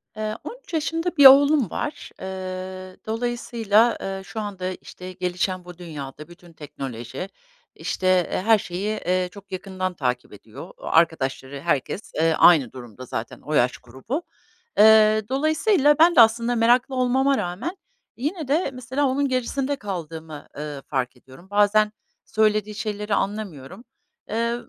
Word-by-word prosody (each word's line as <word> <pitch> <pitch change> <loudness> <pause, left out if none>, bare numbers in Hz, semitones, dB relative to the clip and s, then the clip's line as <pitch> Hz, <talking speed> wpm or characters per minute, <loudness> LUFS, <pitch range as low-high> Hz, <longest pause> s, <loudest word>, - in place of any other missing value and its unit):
Eee, 215 0 -3
13 - - -10
yaşında 330 +2 -1
bir 285 - +7
oğlum 280 - +8
var. 295 - -5
Iıı, 185 0 -6
dolayısıyla, 230 -1 +1
ııı, 195 0 -4
şu 195 +4 -7
anda 200 -3 -4
işte 185 0 -10
gelişen 180 0 -2
bu 180 -1 -11
dünyada 150 -4 -8
bütün 175 0 -16
teknoloji 135 +1 -7 0.5
işte 185 -1 +1 0.2
her 225 0 +6
şeyi, 190 +3 -4
eee, 180 0 0
çok 200 0 -14
yakından 185 0 -4
takip 125 -8 -3
ediyor. 110 - -11
Arkadaşları, 140 -4 0
herkes, 145 - -2
eee, 160 +1 +2
aynı 150 -9 +6
durumda 125 -1 -10
zaten, 110 -1 -6
o 150 - -5
yaş 125 -4 +2
grubu. 135 - -6 0.5
Eee, 215 0 +7
dolayısıyla 295 +3 +3
ben 335 +1 +6
de - - +9
aslında 230 +2 +3
meraklı 245 +3 +3
olmama 265 +2 +2
rağmen 210 - -4 0.4
yine 300 +4 -3
de 300 +3 +1
mesela 255 +3 -2
onun 275 +2 +1
gerisinde 260 +2 -1
kaldığımı, 160 - -7
ııı, 145 -2 -6
fark 130 -2 -2
ediyorum. 135 +9 -17
Bazen 210 +1 +3 0.3
söylediği 215 -1 +1
şeyleri 210 -1 -3
anlamıyorum. 200 - -4 0.5
Eee, 230 +2 0
200 Hz, 135 wpm, -23 LUFS, 165-245 Hz, 0.5 s, de